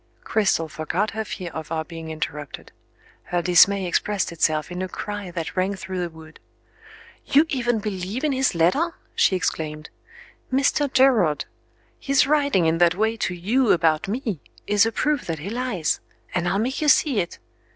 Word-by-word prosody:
Cristel 195 -7 +1
forgot 155 +7 -2
her 220 +1 -3
fear 185 -5 -6
of 160 0 -7
our 160 -1 -2
being 165 -1 -8
interrupted. 150 -2 -6 0.5
Her 175 -1 -1
dismay 190 +2 +5
expressed 190 +2 0
itself 155 -1 0
in 180 +1 -4
a 185 - -2
cry 205 -1 -5
that 170 -2 -5
rang 190 +2 0
through 190 -1 -5
the 175 -1 -2
wood. 160 -1 -14 0.8
"You 295 +4 +4
even 240 -4 0
believe 210 +2 -4
in 305 - +2
his 265 -6 +1
letter?" 275 - +2 0.2
she 190 - +3
exclaimed. 155 -4 -3 0.6
"Mr. 275 +1 +2
Gerard! 240 - +3 0.5
His 275 -2 +3
writing 280 - +2
in 160 +1 +2
that 175 0 +4
way 220 +3 +1
to 185 -4 -2
You 220 +8 +2
about 160 -1 +2
Me 220 - -3 0.3
is 210 +2 +3
a - - -1
proof 295 +4 -1
that 165 -2 -2
he 170 +7 -6
lies; 235 -9 -1 0.3
and 175 -1 0
I'll 195 - +1
make 250 +8 -1
you 305 - +1
see 280 -5 +4
it. 170 - -3
190 Hz, 170 wpm, -23 LUFS, 165-240 Hz, 0.8 s, dismay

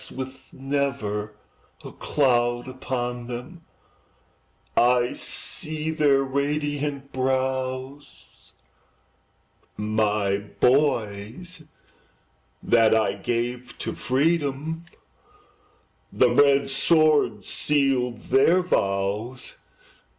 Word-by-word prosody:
With 130 0 -8
never 130 -7 -2 0.5
a - - -7
cloud 120 -3 +1
upon 125 -2 -4
them, 125 +8 -8 1.1
I 120 0 +3
see 155 0 -3
their 145 -3 +3
radiant 140 0 -2
brows; 130 +1 -3 1.2
My 105 -2 0
boys 125 - 0 1.0
that 115 -2 +4
I 110 -3 +2
gave 120 +4 -3
to - - -4
freedom, 150 +3 -1 1.3
The 125 -2 +3
red 140 +1 +4
sword 150 - +2
sealed 135 -5 0
their 170 +7 +5
vows! 105 - -1
130 Hz, 70 wpm, -24 LUFS, 120-145 Hz, 1.3 s, their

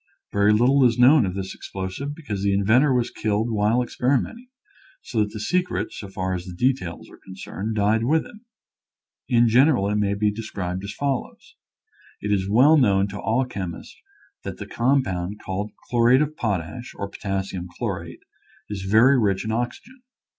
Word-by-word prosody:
Very 100 +1 +3
little 125 +6 +4
is 120 -2 +3
known 125 -2 +6
of 90 - -4
this 95 -1 -4
explosive 95 +10 -6
because 105 -12 -5
the 100 0 +1
inventor 115 +9 +3
was 125 -2 +1
killed 110 +2 -1
while 110 +3 +2
experi 130 +3 +1
menting, 240 - -8 0.5
so 115 - -3
that 105 -1 +2
the 110 - -7
secret, 180 - -1
so 100 - -7
far 95 -1 -3
as 90 0 -5
the 90 - -8
de 130 +8 +3
tails 90 - -8
are - - -16
concerned, 95 +3 -6
died 110 +2 +2
with 155 +5 +2
him. 240 -3 -14 0.9
In 120 -1 +4
general, 125 -2 +4
it 105 - 0
may 100 -1 +1
be 105 +1 +1
described 95 -4 -5
as 100 - -5
follows: 140 0 -4 0.7
It 105 - -3
is 95 -1 0
well 135 +9 +6
known 100 -7 +3
to 100 +1 -7
all 120 +4 +1
chemists 95 -8 -7 0.5
that - - -6
the - - -7
compound 105 -7 0
called 100 +3 -3 0.2
chlo 120 -1 +3
rate 130 +4 +6
of 155 +1 -5
potash, 110 - -3
or 100 - -4
potassium 95 -3 -4
chlorate, - - -5 0.5
is 100 -2 -4
very 110 +8 +4
rich 100 -3 0
in 110 - -2
oxygen. 120 - -4
110 Hz, 180 wpm, -23 LUFS, 100-125 Hz, 0.9 s, known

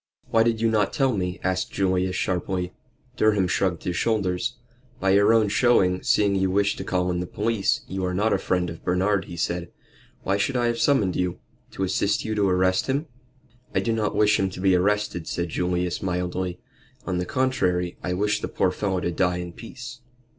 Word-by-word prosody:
"Why 115 - +4
did 115 -1 +2
you 115 -1 +3
not 105 -3 +1
tell 135 -4 +2
me?" 90 -2 -2
asked 95 0 -1
Julius, 95 -1 0
sharply. 90 0 -2 0.4
Durham 105 -4 +3
shrugged 90 -1 0
his 90 - -2
shoulders. 110 +2 0 0.4
"By 95 - +2
your 100 +2 +5
own 110 -2 +4
showing, 100 -5 +3
seeing 100 -1 +2
you 95 -1 +1
wished 100 +2 +1
to - - -3
call 90 -1 0
in 90 - -1
the 90 - -3
police, 105 +1 0
you 95 0 -4
are 90 0 -1
not 105 +4 +2
a - - +1
friend 90 -1 0
to - - -5
Bernard," 95 +2 +1
he 85 - -9
said. 85 +1 -2 0.5
"Why 100 - +1
should 125 +6 0
I 120 - +1
have 120 0 0
summoned 105 -11 +2
you? 90 -1 -1 0.4
To 95 - -3
assist 100 +2 0
you 110 - -1
to 100 -2 +2
arrest 95 0 +2
him?" 140 +4 0 0.7
"I - - +4
do 115 - 0
not 110 -2 -1
wish 105 0 +4
him 95 - +1
to 90 - -9
be 95 0 +3
arrested," 100 -2 0
said 85 -1 -2
Julius, 90 +1 -1
mildly. 90 0 -2 0.5
"On 90 -1 -1
the 90 - -1
contrary, 90 -9 0
I 90 - -1
wish 105 +3 0
the - - -2
poor 95 - +1
fellow 95 -1 -1
to 85 - -1
die 90 0 +1
in 90 -1 -6
peace." 120 +3 -9
95 Hz, 205 wpm, -24 LUFS, 90-105 Hz, 0.7 s, your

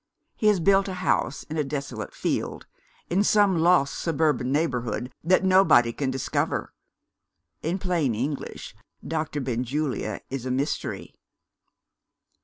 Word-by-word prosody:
He 215 - 0
has 210 -3 +4
built 195 +3 +4
a 190 - -4
house 180 -6 0
in 155 - -6
a 150 - +2
desolate 135 -6 -5
field - - -3 0.5
in 190 +4 +3
some 205 -4 +4
lost 170 -4 +3
suburban 150 -5 +1
neighbourhood 125 -4 -1
that 185 +4 +3
nobody 185 -11 +5
can 135 +1 -2
discover. 130 0 -2 0.9
In 170 +4 -1
plain 170 - 0
English, 135 +6 -4 0.3
Dr. 155 -2 -2
Benjulia 130 +3 -2
is 135 -2 -3
a - - -2
mystery." 135 +4 -2
150 Hz, 125 wpm, -25 LUFS, 130-180 Hz, 0.9 s, nobody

